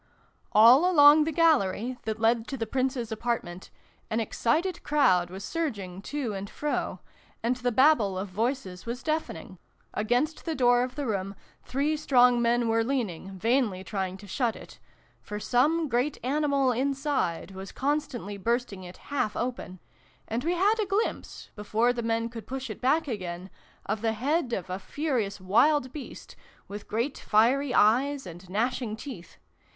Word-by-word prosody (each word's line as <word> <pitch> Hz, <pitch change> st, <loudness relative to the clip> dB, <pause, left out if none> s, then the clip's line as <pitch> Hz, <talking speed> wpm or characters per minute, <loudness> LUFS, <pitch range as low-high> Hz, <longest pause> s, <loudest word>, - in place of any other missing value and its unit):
All 245 Hz, +11 st, +7 dB
along 300 Hz, -2 st, +7 dB
the 320 Hz, -, -1 dB
gallery, 255 Hz, -, +2 dB
that 220 Hz, 0 st, -3 dB
led 225 Hz, +1 st, +2 dB
to 270 Hz, -, -4 dB
the 225 Hz, -, -2 dB
Prince's 255 Hz, -1 st, -2 dB
apartment, 220 Hz, -6 st, -3 dB, 0.4 s
an 220 Hz, -, 0 dB
excited 310 Hz, -, 0 dB
crowd 185 Hz, -13 st, +3 dB
was 190 Hz, +3 st, -7 dB
surging 205 Hz, -, -4 dB
to 260 Hz, -1 st, -3 dB
and 195 Hz, 0 st, -5 dB
fro, 295 Hz, 0 st, -3 dB, 0.4 s
and 245 Hz, +2 st, +1 dB
the 245 Hz, 0 st, -1 dB
Babel 235 Hz, -6 st, +4 dB
of 190 Hz, +2 st, -3 dB
voices 205 Hz, -1 st, -3 dB
was 245 Hz, +3 st, -4 dB
deafening: 195 Hz, -, -3 dB, 0.3 s
against 245 Hz, +9 st, 0 dB
the 325 Hz, -2 st, -3 dB
door 245 Hz, -2 st, +4 dB
of 250 Hz, 0 st, -3 dB
the 285 Hz, -, -3 dB
room 195 Hz, -3 st, -2 dB, 0.3 s
three 285 Hz, +4 st, -1 dB
strong 250 Hz, -5 st, +4 dB
men 235 Hz, 0 st, +2 dB
were 225 Hz, 0 st, +2 dB
leaning, 195 Hz, -7 st, -3 dB
vainly 225 Hz, -2 st, +1 dB
trying 190 Hz, -2 st, -3 dB
to 205 Hz, -, -13 dB
shut 230 Hz, +3 st, -1 dB
it -, -, -13 dB, 0.4 s
for 210 Hz, 0 st, -6 dB
some 305 Hz, +9 st, +2 dB
great 255 Hz, +3 st, 0 dB
animal 280 Hz, 0 st, +1 dB
inside 270 Hz, -, -1 dB
was 190 Hz, 0 st, -8 dB
constantly 270 Hz, -7 st, -2 dB
bursting 230 Hz, -2 st, -2 dB
it 180 Hz, 0 st, -10 dB, 0.2 s
half 220 Hz, -7 st, 0 dB
open, 240 Hz, -7 st, -4 dB, 0.5 s
and 230 Hz, +3 st, -2 dB
we 345 Hz, +2 st, 0 dB
had 410 Hz, +5 st, +2 dB
a 415 Hz, -, -2 dB
glimpse, 400 Hz, +4 st, -3 dB
before 220 Hz, +3 st, +1 dB
the 240 Hz, -, -3 dB
men 230 Hz, 0 st, 0 dB
could 230 Hz, -1 st, -9 dB
push 265 Hz, -2 st, -5 dB
it -, -, -9 dB
back 295 Hz, +5 st, +2 dB
again, 185 Hz, -5 st, -5 dB, 0.3 s
of 215 Hz, -, -2 dB
the 225 Hz, -1 st, +1 dB
head 265 Hz, +4 st, 0 dB
of 190 Hz, -6 st, -3 dB
a 185 Hz, +1 st, -4 dB
furious 225 Hz, -2 st, -2 dB
wild 255 Hz, +8 st, +2 dB
beast, 290 Hz, -5 st, -9 dB, 0.3 s
with 205 Hz, +1 st, -8 dB
great 235 Hz, +6 st, -2 dB
fiery 250 Hz, +6 st, +2 dB
eyes 265 Hz, +6 st, +3 dB
and 175 Hz, +1 st, -11 dB
gnashing 230 Hz, +2 st, -1 dB
teeth. 220 Hz, -7 st, -10 dB
240 Hz, 160 wpm, -27 LUFS, 205-275 Hz, 0.5 s, All